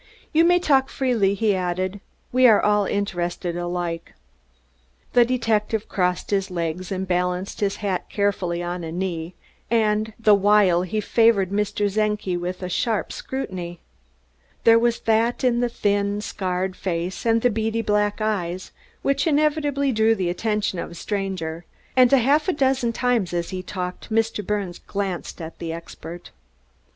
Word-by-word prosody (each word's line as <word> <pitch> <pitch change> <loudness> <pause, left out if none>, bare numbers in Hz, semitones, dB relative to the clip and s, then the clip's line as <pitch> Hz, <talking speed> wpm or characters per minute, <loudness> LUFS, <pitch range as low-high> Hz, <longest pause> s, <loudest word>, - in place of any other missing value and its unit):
"You 320 +1 +5
may 355 +1 +5
talk 275 -6 +3
freely," 225 -7 +1
he 210 0 +2
added. 185 +2 -2 0.3
"We 255 0 +6
are 220 -3 +6
all 210 -1 +2
interested 175 -3 -2
alike." 175 -1 -4 1.0
The 245 - +7
detective 225 -3 0
crossed 180 0 -1
his 195 -1 +1
legs 175 +1 -3
and 190 0 -2
balanced 180 +1 -1
his 200 -1 0
hat 185 -3 -2
carefully 185 -4 -1
on 175 0 -4
a 160 - -5
knee, 175 -1 -3 0.3
the 220 -1 +2
while 200 -3 +4
he 200 +4 -2
favored 215 -4 +3
Mr. 205 0 0
Czenki 210 -2 0
with 180 +1 -4
a - - -2
sharp 220 +3 -1
scrutiny. 180 -10 -5 0.8
There 230 0 +7
was 235 0 +1
that 225 +3 +1
in 245 -2 +3
the 245 0 +1
thin, 205 -2 0
scarred 185 -2 -2
face 180 0 -3
and 230 -1 +3
in - - +3
the 245 - +3
beady 225 +1 -1
black 210 0 +1
eyes 185 -4 -2 0.3
which 275 +4 +1
inevitably 290 -2 +2
drew 220 -1 +3
the 180 -4 -1
attention 210 -1 -1
of - - -4
a 170 - -11
stranger, 185 -4 -3 0.3
and 255 -1 +6
half 280 +5 +4
a 370 - +2
dozen 265 -4 +1
times 230 -7 0
as 170 +2 -2
he 185 -1 -3
talked 180 +3 -6
Mr. 225 -1 +1
Birnes 200 -3 -3
glanced 195 -3 -4
at 165 -1 -8
the 165 - -4
expert. 165 +1 -9
205 Hz, 155 wpm, -23 LUFS, 180-225 Hz, 1.0 s, The